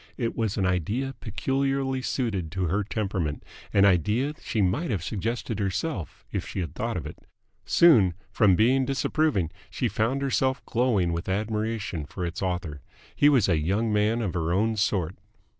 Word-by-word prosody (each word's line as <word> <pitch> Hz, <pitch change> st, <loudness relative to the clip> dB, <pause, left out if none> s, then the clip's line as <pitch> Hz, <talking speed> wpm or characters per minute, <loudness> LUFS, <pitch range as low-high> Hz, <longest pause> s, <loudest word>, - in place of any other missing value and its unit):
It 115 Hz, -3 st, -2 dB
was 110 Hz, -3 st, -1 dB
an 95 Hz, -, +1 dB
idea 105 Hz, -, -1 dB
peculiarly 135 Hz, +4 st, -1 dB
suited 100 Hz, -, -2 dB
to 95 Hz, -1 st, -1 dB
her 95 Hz, +5 st, 0 dB
temperament, 95 Hz, -7 st, -2 dB, 0.3 s
an 100 Hz, -1 st, +5 dB
idea 105 Hz, -, +2 dB
that -, -, -24 dB
she 110 Hz, -, -2 dB
might 100 Hz, -, +1 dB
have 100 Hz, -8 st, -1 dB
suggested 110 Hz, +4 st, -3 dB
herself 100 Hz, -, -3 dB
if -, -, -3 dB
she -, -, -4 dB
had 85 Hz, -, -3 dB
thought -, -, -2 dB
of -, -, -5 dB
it. -, -, -8 dB, 0.5 s
Soon, 110 Hz, -, +5 dB, 0.2 s
from 100 Hz, -4 st, +4 dB
being 130 Hz, +7 st, +4 dB
disapproving, 135 Hz, -, 0 dB, 0.2 s
she 125 Hz, -, -1 dB
found 115 Hz, +6 st, 0 dB
herself 130 Hz, 0 st, 0 dB
glowing 110 Hz, -8 st, +1 dB
with 85 Hz, +3 st, -3 dB
admiration 105 Hz, -5 st, -2 dB
for 90 Hz, +4 st, -4 dB
its 85 Hz, +2 st, -5 dB
author. 90 Hz, -6 st, -3 dB, 0.3 s
He 145 Hz, -, +5 dB
was 130 Hz, -8 st, +4 dB
a 85 Hz, -5 st, +2 dB
young 105 Hz, +8 st, 0 dB
man 110 Hz, +3 st, +2 dB
of 95 Hz, -6 st, -2 dB
her 85 Hz, -1 st, -1 dB
own 110 Hz, +5 st, +2 dB
sort! 95 Hz, -5 st, 0 dB
105 Hz, 175 wpm, -26 LUFS, 90-125 Hz, 0.5 s, an